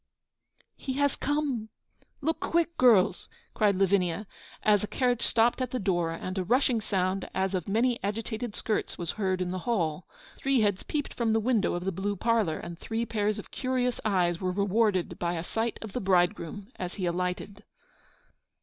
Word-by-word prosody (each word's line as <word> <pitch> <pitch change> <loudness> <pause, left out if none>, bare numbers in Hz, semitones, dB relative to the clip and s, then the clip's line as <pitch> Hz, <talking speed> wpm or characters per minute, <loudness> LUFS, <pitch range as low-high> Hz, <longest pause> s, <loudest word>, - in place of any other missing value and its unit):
'He 265 - -4
has 285 +1 +1
come! 280 -7 -1 0.5
Look 320 +3 0
quick, 335 0 +1
girls!' 210 -7 +4 0.2
cried 205 -3 +3
Lavinia, 195 0 +2 0.4
as 210 -2 +4
a - - -1
carriage 245 -1 +1
stopped 235 +2 +3
at 255 - -1
the 255 - -2
door, 175 -4 +1
and 185 +3 -4
a - - 0
rushing 245 +3 +2
sound, 190 -1 -1
as 190 0 0
of 180 -3 -2
many 235 +4 +1
agitated 220 +2 -3
skirts, 215 - -2
was 170 -2 -2
heard 190 -3 -1
in 180 0 -1
the 185 - -2
hall. 170 -7 0 0.3
Three 270 -3 +2
heads 205 -3 +1
peeped 295 -2 -3
from 230 -2 +1
the 225 - +3
window 225 -5 +1
of 175 +1 -4
the 195 - +1
blue 195 +3 -2
parlour, 220 -6 +1
and 170 0 -8
three 225 +1 -2
pairs 210 -2 0
of - - -9
curious 255 -1 -1
eyes 180 -4 +1
were 185 -1 0
rewarded 200 0 +1
by 170 0 0
a 165 - -3
sight 225 +5 -2
of 215 -3 -8
the 250 - -2
bridegroom, 185 +2 +1
as 180 -1 -4
he 190 - -2
alighted. 180 +3 -2
205 Hz, 180 wpm, -28 LUFS, 185-235 Hz, 0.5 s, girls